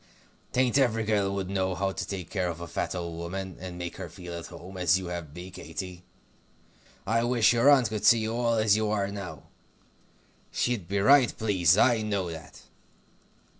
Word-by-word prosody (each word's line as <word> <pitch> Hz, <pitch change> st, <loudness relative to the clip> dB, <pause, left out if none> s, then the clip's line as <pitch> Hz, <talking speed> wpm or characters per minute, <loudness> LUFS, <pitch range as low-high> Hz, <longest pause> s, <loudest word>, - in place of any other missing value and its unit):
'Tain't 130 Hz, +2 st, +2 dB
every 115 Hz, -4 st, +2 dB
girl 105 Hz, -2 st, +1 dB
would 95 Hz, -2 st, -3 dB
know 95 Hz, -1 st, -1 dB
how 95 Hz, +2 st, -1 dB
to -, -, -5 dB
take 95 Hz, -4 st, -6 dB
care 95 Hz, -3 st, -1 dB
of 85 Hz, -1 st, -5 dB
a 85 Hz, -, -6 dB
fat 85 Hz, -, -3 dB
old 85 Hz, -2 st, -5 dB
woman, 95 Hz, +2 st, -5 dB
and 90 Hz, -1 st, -7 dB
make 85 Hz, -1 st, -6 dB
her -, -, -6 dB
feel 85 Hz, -2 st, -8 dB
to 85 Hz, -, -10 dB
home, 95 Hz, +3 st, -11 dB
as 90 Hz, -1 st, +3 dB
you 95 Hz, -2 st, -5 dB
have 85 Hz, -4 st, -6 dB
me, 90 Hz, +1 st, -8 dB
Katy. 90 Hz, -1 st, -7 dB, 1.0 s
I 115 Hz, +3 st, +1 dB
wish 120 Hz, -1 st, +4 dB
your 120 Hz, +4 st, +5 dB
aunt 130 Hz, -6 st, +5 dB
could 105 Hz, -1 st, -4 dB
see 120 Hz, -, +7 dB
you 110 Hz, 0 st, -2 dB
all 120 Hz, -1 st, +1 dB
as 110 Hz, -2 st, +4 dB
you 110 Hz, 0 st, 0 dB
are 100 Hz, -2 st, 0 dB
now. 100 Hz, -2 st, -7 dB, 1.1 s
She'd 120 Hz, -8 st, -1 dB
be 100 Hz, +3 st, -1 dB
right 135 Hz, +3 st, +6 dB
pleased; 95 Hz, -5 st, +3 dB
I 120 Hz, -1 st, +4 dB
know 100 Hz, -5 st, -2 dB
that." 80 Hz, -2 st, -11 dB
95 Hz, 195 wpm, -28 LUFS, 90-110 Hz, 1.1 s, see